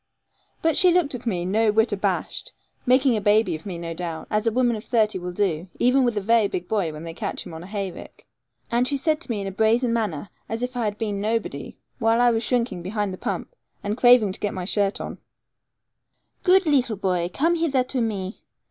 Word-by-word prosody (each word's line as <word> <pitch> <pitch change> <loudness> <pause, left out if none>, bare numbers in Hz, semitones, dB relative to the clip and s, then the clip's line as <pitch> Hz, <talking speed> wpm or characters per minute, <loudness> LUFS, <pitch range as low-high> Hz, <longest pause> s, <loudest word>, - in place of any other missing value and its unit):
But 325 -1 +3
she 365 - +6
looked 345 -5 +2
at 245 -1 -6
me, 175 -5 -1
no 215 +3 +2
whit 220 +2 +2
abashed, 200 -1 -2 0.3
making 255 0 +4
a 215 - -1
baby 210 +1 +3
of 160 +4 -7
me, 180 -3 -4
no 170 0 -5
doubt, 165 -1 -5
as 215 +2 +1
a - - +3
woman 240 0 +2
of 215 - -6
thirty 215 -4 +1
will 180 0 -5
do, 180 -3 -1
even 255 +2 +3
with 240 -3 0
a - - +1
very 225 +1 +3
big 180 -2 -4
boy 195 -7 0
when 155 +1 -8
they 165 -1 -6
catch - - -4
him - - -9
on 160 - -7
a 175 - -10
hayrick, 195 -2 -6 0.5
and 240 +2 +2
she 280 - 0
said 310 +3 0
to - - -6
me 215 -4 -1
in - - -4
a 195 - -3
brazen 230 +4 +2
manner, 205 -6 -2 0.2
as 225 +2 -3
if 250 +1 -3
I 240 -2 -1
had 210 -1 -2
been 210 -3 -2
nobody, 210 -10 -3 0.2
while 225 0 +3
I 245 0 +5
was 225 -1 0
shrinking 235 -5 0
behind 200 +2 -2
the - - -7
pump, - - -4 0.3
and 205 +1 -1
craving 245 -4 +6
to - - -5
get 205 - -2
my 185 -1 -4
shirt 200 +1 +1
on, - - -6 1.2
'Good 380 0 +5
leetle 260 -8 +2
boy, 180 -3 0
come 325 - +2
hither 320 -6 +1
to 255 0 -2
me. 205 -3 -3
220 Hz, 230 wpm, -24 LUFS, 190-245 Hz, 1.2 s, she